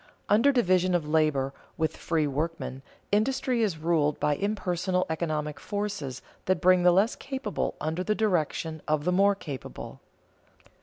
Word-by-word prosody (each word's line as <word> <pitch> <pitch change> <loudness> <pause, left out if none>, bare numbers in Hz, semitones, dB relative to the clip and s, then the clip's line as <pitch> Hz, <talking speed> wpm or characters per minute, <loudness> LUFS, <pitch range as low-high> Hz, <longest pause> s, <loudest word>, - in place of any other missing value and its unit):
Under 230 +7 +5
division 185 -7 +3
of 160 -4 -1
labor, 150 -3 +1 0.2
with 160 -1 0
free 160 -2 0
workmen, 145 -2 -3 0.3
industry 250 +3 +1
is 200 -7 0
ruled 155 -2 +1
by 150 - +2
impersonal 185 -2 -1
economic 155 -2 -2
forces 200 - -4 0.2
that 185 -2 +2
bring 185 +1 +5
the 180 0 +6
less 195 +6 +3
capable 265 -6 -3
under 160 +4 -2
the 215 +2 0
direction 165 -6 0
of 155 -1 0
the 180 - +2
more 200 +2 +4
capable. 145 -8 -8
175 Hz, 145 wpm, -27 LUFS, 155-205 Hz, 0.3 s, the